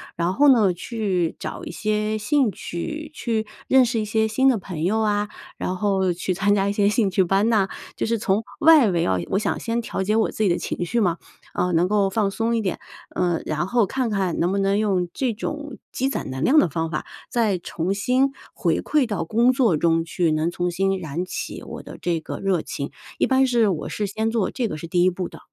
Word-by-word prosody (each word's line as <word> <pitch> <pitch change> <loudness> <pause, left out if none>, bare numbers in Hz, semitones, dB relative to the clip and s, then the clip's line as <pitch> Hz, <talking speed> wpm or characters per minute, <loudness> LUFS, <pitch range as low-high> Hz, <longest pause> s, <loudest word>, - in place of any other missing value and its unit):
然 170 +2 0
后 290 +8 +4
呢 215 -8 +5
去 185 -4 -2
找 - - -6
一 - - -6
些 215 0 -1
兴 260 +1 +2
趣， 305 - -6
去 225 -7 -2 0.2
认 260 -1 +6
识 230 -1 -1
一 215 - -1
些 220 +1 +1
新 260 +5 +3
的 245 - +3
朋 180 -5 -6
友 215 +6 +1
啊， 210 -1 0 0.3
然 185 - -2
后 190 -2 +1
去 185 +2 -2
参 195 +3 +2
加 195 0 +1
一 200 - 0
些 205 -1 +3
兴 210 -1 +2
趣 190 0 +2
班 195 +5 +2
呐。 205 -4 +3 0.3
就 - - -2
是 230 0 0
从 210 +1 0 0.2
外 310 -8 +7
围 170 -3 +1
啊， 95 -1 +1
我 195 - +1
想 210 - -1
先 235 +1 -1
调 220 - -4
节 210 +3 +1
我 225 - +2
自 215 - -2
己 195 - +3
的 175 - +2
情 - - -3
绪 235 +6 0
嘛， 175 -5 +1 0.4
呃， 180 - 0
能 170 +2 +3
够 200 -1 +2
放 200 0 +1
松 230 +3 0
一 225 - 0
点， 185 -4 -2 0.4
呃， 175 -2 +1
然 155 +4 -1
后 235 0 +3
看 255 +3 -1
看 195 -5 -1
能 175 +2 +1
不 200 - 0
能 195 0 +2
用 195 -4 +1
这 255 -4 -1
种 290 +4 -5
积 265 +1 -1
攒 275 - -4
能 130 +2 -4
量 290 - +4
的 185 - +4
方 165 +2 -2
法， 155 - -3 0.2
再 220 -5 +1
重 175 +1 -3
新 255 +7 +2 0.2
回 - - 0
馈 300 -4 +2
到 205 -6 -2
工 230 +8 +3
作 240 - +2
中 165 +1 +2
去， 170 0 0
能 155 +2 +1
重新 180 +2 0
燃 165 +1 -4
起 - - -5
我 - - -8
的 - - -10
这 170 -2 0
个 155 - -6
热 190 -4 +1
情， 140 -1 -5 0.3
一 - - +2
般 265 0 +4
是 240 -4 +3
我 170 -5 -3
是 210 - -2
先 220 +3 -1
做， 225 -4 0
这 245 -4 -1
个 155 - -5
是 165 +2 -7
第 175 +1 +2
1 185 - +5
步 180 0 -4
的。 - - -12
200 Hz, 250 characters per minute, -23 LUFS, 180-230 Hz, 0.4 s, 外